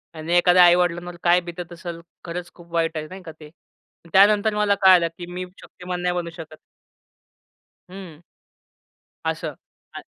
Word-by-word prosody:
आणि 160 Hz, +2 st, -4 dB
एखाद्या 180 Hz, 0 st, +6 dB
आई-वडिलांवर 175 Hz, 0 st, +2 dB
काय 175 Hz, +1 st, +4 dB
बितत 175 Hz, 0 st, -8 dB
असल. 170 Hz, 0 st, -8 dB, 0.3 s
खरंच, 175 Hz, 0 st, -6 dB
खूप 170 Hz, -1 st, -17 dB
वाईट 165 Hz, -1 st, 0 dB
आहे 155 Hz, 0 st, -5 dB
नाही 190 Hz, +4 st, -10 dB
का 165 Hz, -, -9 dB
ते. 155 Hz, -, -12 dB, 0.6 s
अन -, -, -16 dB
त्यानंतर 210 Hz, +2 st, +5 dB
मला 210 Hz, -1 st, +2 dB
कळालं, 185 Hz, -3 st, +6 dB
की 175 Hz, -, -7 dB
मी 180 Hz, +1 st, -5 dB, 0.2 s
शक्तिमान 180 Hz, 0 st, -7 dB
नाही 180 Hz, 0 st, -1 dB
बनू 175 Hz, -1 st, -3 dB
शकत. 155 Hz, -1 st, -10 dB, 1.3 s
हम्म. 180 Hz, -5 st, -11 dB, 1.0 s
असं -, -, -2 dB, 0.5 s
आहे. -, -, -8 dB
175 Hz, 155 wpm, -22 LUFS, 170-180 Hz, 1.3 s, एखाद्या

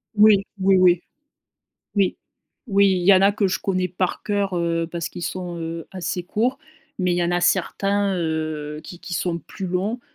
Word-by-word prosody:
Oui. 210 Hz, -2 st, +6 dB
Oui, 190 Hz, 0 st, +4 dB
oui 180 Hz, -1 st, +5 dB, 1.0 s
oui 195 Hz, -2 st, +2 dB, 0.5 s
oui. 200 Hz, 0 st, +4 dB
Il 180 Hz, -1 st, -1 dB
y 200 Hz, -, +8 dB
en 185 Hz, -, +4 dB
a 200 Hz, +1 st, +5 dB
que 205 Hz, -1 st, +1 dB
je -, -, -1 dB
connais 185 Hz, -1 st, 0 dB
par 180 Hz, +1 st, -2 dB
cœur, 200 Hz, -2 st, -1 dB
heu, 165 Hz, -1 st, 0 dB
parce 170 Hz, -1 st, -3 dB
qu'ils 175 Hz, -, -9 dB
sont 175 Hz, 0 st, -4 dB
heu, 165 Hz, 0 st, -5 dB
assez 180 Hz, -1 st, -3 dB
courts 235 Hz, +9 st, -1 dB, 0.4 s
mais 180 Hz, -1 st, +1 dB
il -, -, 0 dB
y 175 Hz, -, +1 dB
en 170 Hz, -, 0 dB
a 175 Hz, -, +1 dB
certains 200 Hz, +2 st, +1 dB
heu, 155 Hz, -2 st, -3 dB
qui 175 Hz, -, -10 dB
qui 180 Hz, -, -6 dB
sont 170 Hz, 0 st, -1 dB
plus 190 Hz, -, -9 dB
longs, 195 Hz, +7 st, -2 dB
180 Hz, 195 wpm, -22 LUFS, 170-195 Hz, 1.0 s, y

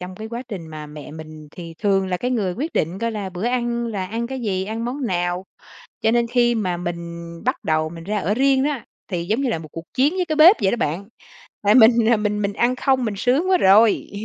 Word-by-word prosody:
trong 180 Hz, +1 st, -7 dB
cái 220 Hz, +1 st, -7 dB
quá 235 Hz, +2 st, -5 dB
trình 185 Hz, -7 st, -6 dB
mà 155 Hz, -1 st, -8 dB
mẹ 150 Hz, -1 st, -10 dB
mình 155 Hz, -1 st, -10 dB
thì 165 Hz, 0 st, -9 dB
thường 195 Hz, -2 st, +1 dB
là 180 Hz, -, 0 dB
cái 250 Hz, +6 st, -3 dB
người 205 Hz, -7 st, 0 dB
quyết 305 Hz, +7 st, -4 dB
định 170 Hz, +5 st, -1 dB
coi 230 Hz, 0 st, -1 dB
là 205 Hz, -3 st, -4 dB
bữa 180 Hz, +4 st, -5 dB
ăn 240 Hz, -1 st, -1 dB
là 200 Hz, -5 st, -3 dB
ăn 230 Hz, +4 st, -3 dB
cái 265 Hz, 0 st, -5 dB
gì, 190 Hz, -4 st, -1 dB
ăn 225 Hz, +3 st, -4 dB
món 255 Hz, +1 st, -3 dB
nào, 175 Hz, 0 st, -1 dB, 0.6 s
cho 220 Hz, -, +3 dB
nên 235 Hz, 0 st, +2 dB
khi 240 Hz, -1 st, +2 dB
mà 185 Hz, -5 st, -1 dB
mình 170 Hz, -1 st, -5 dB, 0.2 s
bắt -, -, +2 dB
đầu 155 Hz, 0 st, 0 dB
mình 165 Hz, 0 st, -10 dB
ra 210 Hz, +3 st, -2 dB
ở 195 Hz, +3 st, 0 dB
riêng 270 Hz, +2 st, +3 dB
á, 285 Hz, -5 st, -2 dB, 0.2 s
thì 175 Hz, -3 st, -3 dB
giống 220 Hz, +8 st, 0 dB
như 265 Hz, -, 0 dB
là 165 Hz, -, -1 dB
một 155 Hz, -, -10 dB
cuộc 165 Hz, -, -7 dB
chiến 275 Hz, +6 st, +2 dB
với 365 Hz, -, 0 dB
cái 310 Hz, -3 st, -2 dB
bếp 335 Hz, +7 st, +8 dB
vậy 190 Hz, -, +2 dB
đó -, -, +1 dB
bạn. 190 Hz, +1 st, -2 dB, 0.6 s
Tại 205 Hz, +1 st, +4 dB
mình, 230 Hz, -1 st, +6 dB
à, 235 Hz, -, +5 dB
mình 210 Hz, 0 st, -1 dB
mình 200 Hz, 0 st, -1 dB
ăn 245 Hz, +4 st, +1 dB
không, 260 Hz, -2 st, +1 dB
mình 210 Hz, -3 st, -2 dB
sướng 270 Hz, -, +1 dB
quá 370 Hz, -, +5 dB
rồi, 205 Hz, +3 st, +4 dB
210 Hz, 255 wpm, -21 LUFS, 180-240 Hz, 0.6 s, bếp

